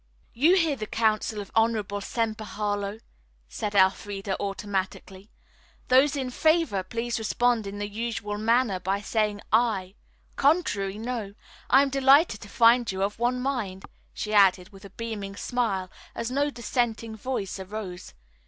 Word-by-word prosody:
"You 310 +10 +4
hear 330 -6 +2
the 215 -4 -6
counsel 215 -1 0
of 200 - -11
honorable 220 -3 +1
Semper 220 0 -2
Harlowe," 205 0 -3 0.5
stated 205 - -3
Elfreda 195 +1 +1
automatically. 195 0 -4 0.6
"Those 270 +3 +5
in 260 -3 -3
favor 315 - +2
please 230 +4 -3
respond 225 0 +1
in 200 +1 -6
the 205 0 -3
usual 210 -1 -4
manner 225 -3 +2
by 195 +2 -1
saying 210 -1 -1
'aye.' 215 -5 +2 0.4
Contrary 210 - +1
'no.' 220 -3 -4 0.3
I 270 +2 +6
am 275 - -2
delighted 275 -3 +4
to 205 - -10
find 235 +1 +4
you 190 0 -2
of 205 +2 -2
one 245 +1 +1
mind," 225 -8 -3 0.3
she 215 - -4
added, 190 -3 +4
with 200 -1 -14
a - - -10
beaming 205 -2 -6
smile, 200 -5 -2 0.2
as 230 +1 -3
no 285 +2 +1
dissenting 230 -3 -2
voice 215 -4 -4
arose. 190 - -7
215 Hz, 145 wpm, -26 LUFS, 200-245 Hz, 0.6 s, I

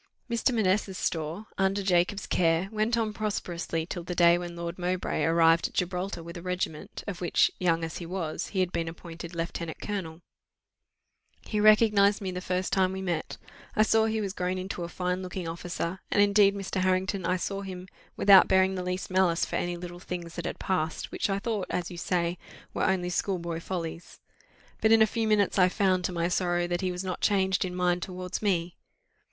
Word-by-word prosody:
Mr. 235 +2 +1
Manessa's 200 -4 +1
store 165 +5 -2
under 195 +1 +1
Jacob's 185 +1 +1
care 165 +2 +1
went 220 +2 +1
on 220 -2 0
prosperously 175 -6 -3
till 175 +1 -5
the 175 +1 -5
day 170 0 +6
when 175 -1 -5
Lord 170 +1 -5
Mowbray 180 +1 -1
arrived 165 0 +4
at - - -17
Gibraltar 180 0 -2
with 170 +1 -9
a - - -7
regiment, 180 -3 -4
of 185 -3 -5
which, 175 - +3
young 165 -2 +1
as 165 - -4
he 170 - -7
was, 170 -3 -3
he 190 - -1
had 180 -1 0
been 165 -2 -2
appointed 170 +1 -8
lieutenant 170 -1 -4
colonel: 175 -5 -5 1.2
"He 210 - -3
recognized 210 -1 +5
me 190 -3 -3
the 180 0 -5
first 185 0 -2
time 190 -1 +2
we 190 0 -4
met; 170 -4 -3 0.4
I 215 - +5
saw 220 0 +3
he 220 0 0
was 195 -2 -3
grown 180 -1 -2
into 185 -1 -4
a 170 - -5
fine 180 +1 -2
looking 185 -1 -5
officer; 170 +2 -4
and - - +1
indeed, 205 0 +5
Mr. 195 -1 -3
Harrington, 185 +1 +1
I 180 +2 +1
saw 195 +2 -3
him, 185 -2 -7 0.3
without 195 -2 +8
bearing 190 0 +4
the 185 - -3
least 180 +1 -3
malice 185 -2 +3
for - - -3
any 175 0 -2
little 175 0 -8
things 175 -2 -6
that - - -5
had - - -3
passed, 160 -4 -2
which - - -1
I 195 - +1
thought, 205 -2 -2
as 180 0 -2
you 175 - -8
say, 175 0 -1 0.3
were - - 0
only 180 -2 +1
schoolboy 170 -3 -2
follies. 170 -1 -6 0.6
But 220 - +4
in 225 -1 +7
a - - +6
few 225 +1 -1
minutes 205 -2 +2
I 180 0 +6
found, 185 -2 +1
to - - -1
my 170 -1 0
sorrow, 175 -1 +1
that 175 0 -2
he 185 -1 0
was 180 +1 -4
not 185 -2 -4
changed 190 -2 +2
in 180 -1 -4
mind 180 0 +1
towards 180 0 -5
me. 180 -4 0
180 Hz, 205 wpm, -28 LUFS, 175-195 Hz, 1.2 s, without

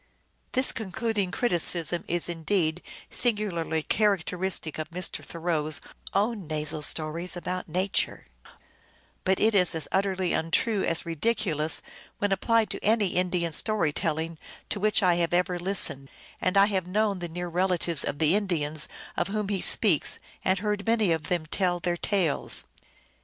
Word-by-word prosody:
This 260 0 +4
concluding 215 -1 -2
criticism 175 - +2
is 175 0 +2
indeed 170 0 -1 0.3
singularly 185 -9 0
characteristic 190 -5 0
of 155 0 -4
Mr. 180 +1 -2
Thoreau 165 -2 -2
s 155 - +2 0.3
own 205 -3 -1
nasal 155 0 0
stories 165 +4 +2
about 180 +1 -4
Nature, 185 - +1 1.0
but 190 0 +1
it 220 +1 +3
is 180 -4 +3
as 160 -3 -1
utterly 190 -2 0
untrue 195 +6 +1
as 165 - +2
ridiculous 165 -2 0 0.3
when 205 -1 -1
applied 225 +3 +2
to - - -5
any 215 -2 +2
Indian 180 -2 -1
story 205 -2 +1
telling 160 +1 -3 0.3
to 205 - -3
which 210 0 +2
I 175 -2 +4
have 170 0 +1
ever 180 0 0
listened, 165 -7 -1 0.3
and 185 +2 +1
I 195 - +7
have 190 -4 -2
known 205 0 0
the 175 -1 -5
near 175 +2 -5
relatives 175 -2 0
of 145 - -3
the 155 +2 +3
Indians 160 -7 -1 0.3
of - - -1
whom 210 0 -3
he 195 -3 -1
speaks, 185 -10 +3 0.3
and 190 +1 +2
heard 210 +1 -3
many 220 -5 +2
of 160 -2 -1
them 175 -3 -1
tell 175 +2 0
their 175 0 -1
tales. 175 -4 +1
180 Hz, 150 wpm, -27 LUFS, 165-200 Hz, 1.0 s, I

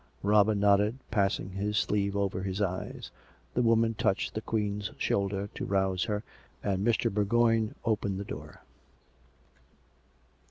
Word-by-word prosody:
Robin 105 0 +4
nodded, 105 +3 +3
passing 95 -2 0
his 105 +2 -2
sleeve 100 -1 +1
over 100 -2 -1
his 95 0 -3
eyes. 95 -3 -3 0.4
The 125 - +1
woman 115 -1 +3
touclied 95 -2 0
the 110 - -3
Queen's 105 -2 -2
shoulder 100 0 0
to - - -5
rouse 95 -1 +1
her, 105 0 -2 0.4
and 100 -1 0
Mr. 115 -3 +1
Bourgoign 115 +1 +2
opened 105 -4 0
the 100 - -5
door. - - -8
100 Hz, 130 wpm, -29 LUFS, 100-110 Hz, 0.4 s, Robin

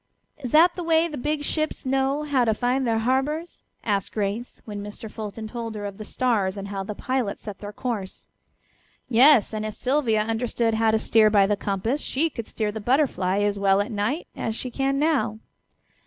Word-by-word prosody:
"Is 255 -4 -5
that 330 +6 +6
the 360 - -4
way 325 0 +3
the 310 - -7
big 295 +2 -2
ships 310 0 -2
know 270 +2 +1
how 285 -4 +2
to 220 -2 +2
find 250 +2 0
their 225 -1 +2
harbors?" 270 +8 -1 0.2
asked 200 -3 -1
Grace, 210 +3 -3
when 205 -2 -6
Mr. 210 +2 -8
Fulton 220 0 -6
told 230 -1 -5
her 205 -1 -5
of 200 0 -7
the 215 - -6
stars, 210 -6 0
and 200 0 -6
how 195 -1 -3
the 205 +2 -5
pilots 255 -4 -2
set 205 -2 -7
their 205 0 -7
course. 210 -4 -5 0.8
"Yes, 250 -1 +6
and 215 0 -2
if 215 -1 -4
Sylvia 250 -4 +1
understood 225 +1 0
how 225 0 +2
to 220 - +3
steer 220 0 +4
by 205 -2 +5
the 205 +1 +1
compass 205 +8 -1
she 315 +4 0
could 230 -5 -6
steer 215 -2 -2
the 220 +1 -6
Butterfly 205 -6 +1
as 205 -1 0
well 195 0 +4
at 205 - -1
night 220 - -1
as 225 - -3
she 250 +1 -5
can 270 +2 0
now." 275 -8 +1
225 Hz, 200 wpm, -24 LUFS, 210-270 Hz, 0.8 s, that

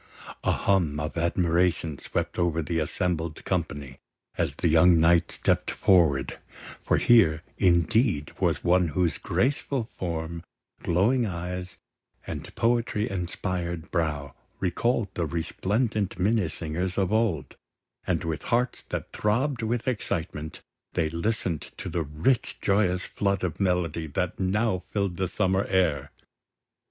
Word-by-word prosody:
A - - +3
hum 85 -7 +1
of 75 +1 -4
admiration 85 -2 +1
swept - - -3
over 85 -2 +1
the 80 +2 -1
assembled 80 +1 -2
company 75 -7 -3 0.4
as - - -1
the - - 0
young 85 +1 +6
knight 85 0 +4
stepped - - +1
forward, 80 -8 +3 0.4
for - - +2
here, 80 -10 +5 0.2
indeed, 85 - +3
was - - +1
one 90 0 +4
whose 85 +2 0
graceful 135 -1 0
form, 85 -5 -5 0.4
glowing 110 +8 +2
eyes, 90 0 -5 0.5
and - - -7
poetry 115 -3 +1
inspired 90 -2 -3
brow 75 -5 -1 0.3
recalled 105 +4 0
the 85 -2 -1
resplendent 100 - -1
Minnesingers 90 -3 -1
of 100 0 +1
old; 110 - 0 0.5
and - - 0
with 80 -1 -3
hearts 125 +1 +1
that - - -4
throbbed 120 +5 0
with 115 +2 -1
excitement, 85 -10 -3 0.3
they 80 -3 +1
listened 85 -1 -2
to - - -5
the 85 - -1
rich 80 - 0
joyous 95 -2 +2
flood 100 -1 -1
of 85 -5 -2
melody 90 -4 0
that 90 +4 -2
now 95 0 +1
filled 100 -4 -1
the 95 - 0
summer 95 +1 +1
air. 80 -7 +1
90 Hz, 125 wpm, -27 LUFS, 80-100 Hz, 0.5 s, young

